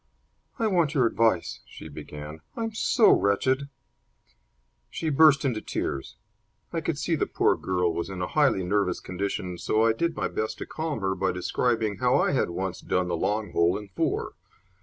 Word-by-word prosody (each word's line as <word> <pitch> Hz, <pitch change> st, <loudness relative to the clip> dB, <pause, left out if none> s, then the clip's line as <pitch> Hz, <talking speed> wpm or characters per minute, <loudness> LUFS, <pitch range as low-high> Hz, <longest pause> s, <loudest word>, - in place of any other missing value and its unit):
"I 230 Hz, -, 0 dB
want 170 Hz, -7 st, +2 dB
your 130 Hz, -4 st, +4 dB
advice," 115 Hz, -6 st, +1 dB
she -, -, -10 dB
began. 75 Hz, +1 st, -9 dB, 0.2 s
"I'm 225 Hz, -1 st, -2 dB
so 225 Hz, +1 st, +4 dB
wretched!" 130 Hz, +8 st, +2 dB, 1.2 s
She 160 Hz, -2 st, -2 dB
burst 145 Hz, -1 st, +5 dB
into 120 Hz, -5 st, 0 dB
tears. 70 Hz, -2 st, -4 dB, 0.6 s
I 165 Hz, -, -1 dB
could 160 Hz, -2 st, -2 dB
see 165 Hz, -, -1 dB
the -, -, 0 dB
poor -, -, +2 dB
girl 90 Hz, -2 st, 0 dB
was 85 Hz, -, -3 dB
in 95 Hz, -1 st, -6 dB
a 90 Hz, -, -1 dB
highly 140 Hz, -9 st, +2 dB
nervous 90 Hz, 0 st, 0 dB
condition, 90 Hz, -1 st, -4 dB
so 110 Hz, +5 st, +2 dB
I 115 Hz, -, +4 dB
did 170 Hz, +7 st, -1 dB
my -, -, -1 dB
best 110 Hz, 0 st, -3 dB
to -, -, -6 dB
calm 155 Hz, -7 st, -4 dB
her 95 Hz, 0 st, 0 dB
by 95 Hz, 0 st, 0 dB
describing 110 Hz, +3 st, 0 dB
how 125 Hz, +3 st, +3 dB
I -, -, +2 dB
had 135 Hz, -, +1 dB
once 95 Hz, +1 st, -4 dB
done 90 Hz, -1 st, 0 dB
the 85 Hz, -, 0 dB
long 105 Hz, +5 st, -1 dB
hole 85 Hz, +1 st, +2 dB
in 105 Hz, -1 st, -9 dB
four. 95 Hz, -, -2 dB
105 Hz, 180 wpm, -26 LUFS, 90-140 Hz, 1.2 s, burst